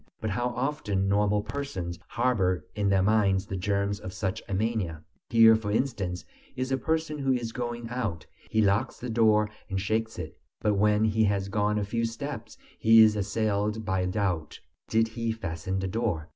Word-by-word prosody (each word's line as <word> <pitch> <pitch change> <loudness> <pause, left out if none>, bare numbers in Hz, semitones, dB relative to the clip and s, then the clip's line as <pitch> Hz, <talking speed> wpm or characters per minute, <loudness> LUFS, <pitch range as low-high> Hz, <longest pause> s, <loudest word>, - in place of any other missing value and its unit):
But 110 -1 -2
how 120 +5 0
often 120 -8 -1
normal 105 +1 +2
persons 105 -9 -5
harbor 95 -9 +1
in 105 -1 0
their 95 -1 +3
minds 100 -2 +3
the 95 - -5
germs 100 +1 -1
of 95 - -7
such 95 -1 -2
a - - -2
mania! 95 -7 -1 0.3
Here, 115 -1 +7
for 110 -2 -3
instance, 105 -6 -1 0.3
is 130 +1 -3
a 135 - +2
person 160 -2 -1
who 135 -1 +1
is 120 -2 -2
going 120 -1 -4
out; 110 -10 -3 0.2
he 110 - +2
locks 105 +6 +1
the 125 -1 -4
door 105 -2 +3 0.2
and 95 -1 -1
shakes 110 +3 -1
it; - - -7 0.2
but 105 - +1
when 105 +1 +3
he 110 0 +2
has 100 -1 0
gone 105 0 +1
a 105 - 0
few 115 +3 -1
steps 115 -1 -6 0.2
he 115 0 +7
is 110 -1 +4
assailed 105 +1 -1
by 95 -2 0
doubt: 90 -5 -2 0.3
did 115 0 +2
he 115 0 -2
fasten 95 -4 -4
the 95 0 -1
door? 95 -6 -2
105 Hz, 185 wpm, -28 LUFS, 95-115 Hz, 0.3 s, Here